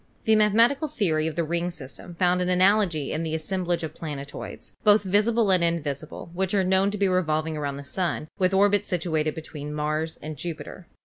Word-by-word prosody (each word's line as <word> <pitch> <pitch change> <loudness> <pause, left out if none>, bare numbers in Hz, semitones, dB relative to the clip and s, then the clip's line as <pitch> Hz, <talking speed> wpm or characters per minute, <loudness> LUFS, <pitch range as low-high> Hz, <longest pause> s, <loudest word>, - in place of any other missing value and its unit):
The 220 -1 +4
mathematical 230 +8 +4
theory 165 - 0
of 160 - -4
the 170 - +1
ring 170 +2 -1
system 165 +1 -8
found 180 +1 +2
an 180 - 0
analogy 185 -5 +3
in 155 - -2
the 160 -1 -2
assemblage 175 +1 -2
of 155 -1 -4
planetoids, 145 -4 -7
both 210 -1 +5
visible 210 +2 +2
and 180 -2 +3
invisible, 155 -1 -3
which 190 +2 -1
are 195 - +3
known 190 +1 +3
to 210 - -4
be 200 -1 +2
revolving 160 -4 0
around 140 -2 -3
the 140 - -7
Sun 165 0 -2
with 185 -1 +3
orbits 200 +1 +3
situated 160 -3 -1
between 150 -2 -7
Mars 155 +2 -2
and 155 0 -7
Jupiter. 170 +2 -7
175 Hz, 190 wpm, -25 LUFS, 155-195 Hz, -, both